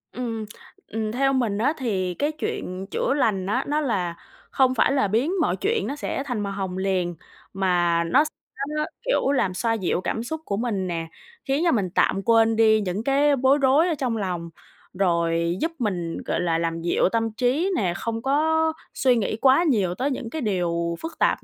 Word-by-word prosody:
Ừm, 230 -3 -4 0.4
ừm, 220 0 -3
theo 270 +3 +1
mình 235 -6 0
á 260 +8 +2
thì 190 -8 -1
cái 290 - -1
chuyện 190 - -4
chữa - - 0
lành 215 -9 +1
á 245 +7 0
nó 300 +2 +1
là 190 - -1 0.4
không 260 -1 +3
phải 225 - +3
là 270 -6 +2
biến 235 - +1
mọi - - +1
chuyện 440 +2 0
nó 280 - -3
sẽ 280 -1 -3
thành 245 -5 -2
màu 200 -1 -3
hồng 190 -2 -4
liền, 185 -2 -1 0.4
mà 175 -3 +2
nó 215 - +4
s - - -3 0.4
nó 300 - -5
nó, 305 - +1 0.2
kiểu, - - +2
làm 225 -9 +1
xoa 225 +5 0
dịu 190 -4 -1
cảm 225 - -2
xúc 315 +6 -5
của 200 - -2
mình 210 -5 -1
nè, 165 -2 -3 0.4
khiến 275 +4 0
cho 340 - +4
mình 200 - +1
tạm 195 - +2
quên 225 -1 +4
đi 220 -1 +4
những 195 +2 -3
cái 280 +2 +3
bối 265 +2 +3
rối 275 +6 +4
ở 330 - 0
trong 250 -5 -1
lòng, 180 -5 -3 0.4
rồi 170 -2 +1
giúp 330 - 0
mình, 180 -8 -2
gọi - - -1
là, 170 -2 +1
làm 165 0 -2
dịu 170 +2 +2
tâm 225 -1 0
trí 255 - +1
nè, 185 -6 0
không 225 +2 -3
có 320 +4 +2 0.2
suy 255 -2 +3
nghĩ 215 -1 -1
quá 270 +5 +5
nhiều 205 - +1
tới 270 +8 -1
những 250 -3 -4
cái 315 +5 -4
điều 170 -5 -1
phức 325 - -7
tạp - - +2
225 Hz, 205 wpm, -24 LUFS, 185-275 Hz, 0.4 s, quá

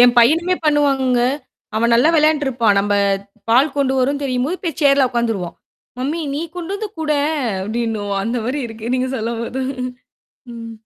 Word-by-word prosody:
என் 245 0 +6
பையனுமே 330 +9 +4
பண்ணுவாங்கங்க. 275 -4 +2 0.5
அவன் 235 +1 +2
நல்லா 245 +6 +5
விளையாடிட்டு 305 -1 +3
இருப்பான். 230 -5 +2
நம்ம 205 +1 -1 0.6
பால் 270 +5 +4
கொண்டு 270 -2 +2
வரும் 280 +3 0
தெரியும் 255 -1 0
போய் 340 0 -4
சேர்ல 275 -2 +5
உக்காந்துருவான். 225 -8 -2 0.4
மம்மி, 295 +6 -2
நீ 295 - -2 0.2
கொண்டு 355 +2 -4
வந்து 425 +1 -4
குடேன் 305 0 0 0.3
அப்பிடின்னுவான் 210 -1 -2
அந்தமாரி 245 +4 -2
இருக்கு. 225 +2 -5
நீங்க 255 0 -1
சொல்லும்போது 235 +3 -3 0.9
ம். 230 0 -8
255 Hz, 145 wpm, -19 LUFS, 230-295 Hz, 0.9 s, என்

